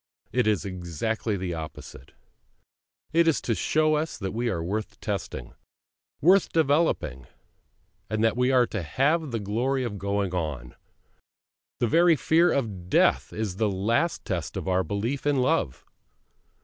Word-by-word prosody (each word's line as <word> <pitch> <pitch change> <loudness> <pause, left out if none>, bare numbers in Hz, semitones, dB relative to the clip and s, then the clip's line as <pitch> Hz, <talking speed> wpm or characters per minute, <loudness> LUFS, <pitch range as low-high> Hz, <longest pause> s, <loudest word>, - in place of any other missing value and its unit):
It 125 -3 +1
is 105 -3 +1
exactly 95 +4 -3
the 90 -2 -3
opposite; 80 -4 -9 1.0
it 165 0 +4
is 160 - +3
to 115 - 0
show 155 +7 +2
us 155 +2 -1
that 95 -3 -4
we 120 +2 -1
are 85 -6 -2
worth 105 +3 -4
testing, 100 - -4 0.7
worth 190 +5 +5
developing, 145 - +1 0.8
and 110 0 0
that 115 -1 +3
we 125 +1 +2
are 125 -2 +5
to 105 -4 -4
have 145 - +1
the 115 -2 -2
glory 120 +7 -1
of 105 -5 -4
going 100 -1 -1
on; 75 -8 -3 1.1
the - - +2
very 170 +6 +5
fear 165 +5 +3
of 100 -10 -2
death - - +3
is 105 -4 -4
the 110 -1 +1
last 115 - 0
test - - -3
of - - -5
our 95 0 +2
belief 115 +10 -2
in 145 - +3
Love. 130 - 0
110 Hz, 150 wpm, -26 LUFS, 95-140 Hz, 1.1 s, worth